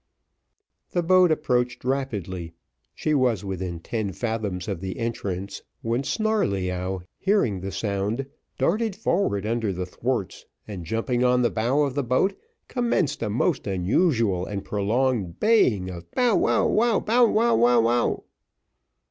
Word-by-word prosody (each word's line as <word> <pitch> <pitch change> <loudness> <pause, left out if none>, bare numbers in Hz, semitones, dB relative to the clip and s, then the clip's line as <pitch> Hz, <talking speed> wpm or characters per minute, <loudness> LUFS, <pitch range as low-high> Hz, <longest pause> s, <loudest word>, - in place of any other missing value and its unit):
The 175 - +1
boat 185 0 +5
approached 125 -6 0
rapidly 100 -11 -3 0.4
she 155 - -1
was 125 -8 +1
within 95 -3 -4
ten 105 +2 -3
fathoms 105 -6 -3
of 95 -4 -3
the 95 -1 -5
entrance, 100 -5 -4 0.2
when 115 +3 0
Snarleyyow, 95 - -1 0.2
hearing 190 - +1
the 95 +2 -5
sound, 100 +5 -2 0.3
darted 215 +2 +1
forward 170 - 0
under 115 -2 0
the 90 0 -3
thwarts, 115 +2 -3 0.2
and 95 -5 -7
jumping 120 +4 0
on 125 0 +3
the 120 - +2
bow 125 +7 +1
of 140 -3 -1
the 140 - 0
boat, 130 +11 +2 0.3
commenced 235 - 0
a 110 - -1
most 110 0 0
unusual 100 - +1
and 100 0 -5
prolonged 105 -2 0
baying 120 - +3
of 85 -1 -9
Bow 245 -3 +2
wow, - - +3 0.3
bow 240 +2 +4
wow 225 +2 +3
wow 120 +1 +5
wow! 120 +1 +1
115 Hz, 140 wpm, -25 LUFS, 95-140 Hz, 0.4 s, boat